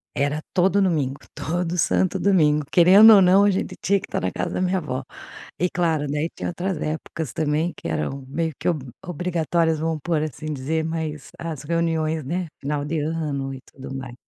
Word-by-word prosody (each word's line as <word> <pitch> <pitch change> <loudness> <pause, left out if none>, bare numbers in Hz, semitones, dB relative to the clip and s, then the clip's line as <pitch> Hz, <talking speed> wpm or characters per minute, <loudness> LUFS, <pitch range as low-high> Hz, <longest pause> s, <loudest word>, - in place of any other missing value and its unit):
Era 145 +2 0
todo 190 +2 +3
domingo, 150 -8 +1 0.2
todo 175 +1 -2
santo 185 +2 +1
domingo, 150 -7 +3
querendo 195 +6 +8
ou 200 - +7
não, 190 +2 +6
a - - +5
gente 190 - -3
tinha 200 - +3
que 195 - -7
tá - - -1
na 95 - -1
casa - - -3
da - - -2
minha 185 +1 +1
avó 130 -6 -4 0.5
e 180 - +2
claro, 165 -4 0
daí 150 +3 -1
tinha - - -4
outras 175 0 -3
épocas 155 -2 -4
também, 155 +2 0
que - - -7
eram 80 - -3
meio 160 +3 -2
que - - -7
ob 165 -6 +1 0.2
obrigatórias, 170 -2 0
vamos 160 0 -2
pôr 160 -1 0
assim 155 -1 -5
dizer, 150 +4 -1
mas 160 -2 -4
as 160 -5 -5
reuniões, 160 -1 0
né, 175 +5 -2
final 145 +1 -3
de 160 +1 -1
ano 145 -3 -2
e 135 - -8
tudo 135 0 -9
mais. 130 -2 -6
160 Hz, 195 wpm, -23 LUFS, 150-175 Hz, 0.5 s, querendo